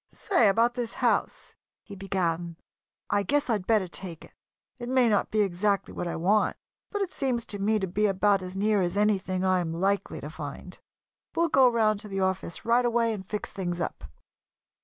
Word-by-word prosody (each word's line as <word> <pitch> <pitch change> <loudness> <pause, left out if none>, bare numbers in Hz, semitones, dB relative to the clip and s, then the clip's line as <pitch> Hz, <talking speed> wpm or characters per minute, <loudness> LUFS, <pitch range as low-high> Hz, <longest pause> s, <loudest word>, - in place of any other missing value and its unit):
"Say, 360 - +2
about 230 +4 +3
this 240 -2 -3
house," - - -1 0.3
he 205 - -10
began, 175 -4 -2 0.5
"I 205 - +3
guess 285 +6 +1
I'd 205 -4 -1
better 215 -5 +3
take 175 -2 -8
it. - - -20 0.5
It 240 0 -5
may 255 -2 +4
not 210 -2 +2
be 215 - +1
exactly 195 +1 0
what 175 - -4
I - - -3
want 200 +6 +2 0.3
but 410 -1 -1
it 370 - -6
seems 250 -4 -1
to 205 - -3
me 215 +2 +2
to 195 - -1
be 205 +4 +1
about 195 0 +2
as 185 +1 -7
near 210 0 +2
as 175 +2 -1
anything 190 -3 +1
I 185 -1 +3
am 170 -2 -2
likely 195 +4 -1
to 150 - -7
find. 155 +4 -8 0.6
We'll 335 0 +2
go 265 -4 +6
round 215 -3 +2
to 210 - -9
the 195 -1 -3
office 190 -2 -2
right 235 +2 +3
away 235 -1 +1
and 200 -3 -6
fix 210 - -4
things 175 -3 -3
up." 120 - -4
200 Hz, 200 wpm, -27 LUFS, 185-225 Hz, 0.6 s, go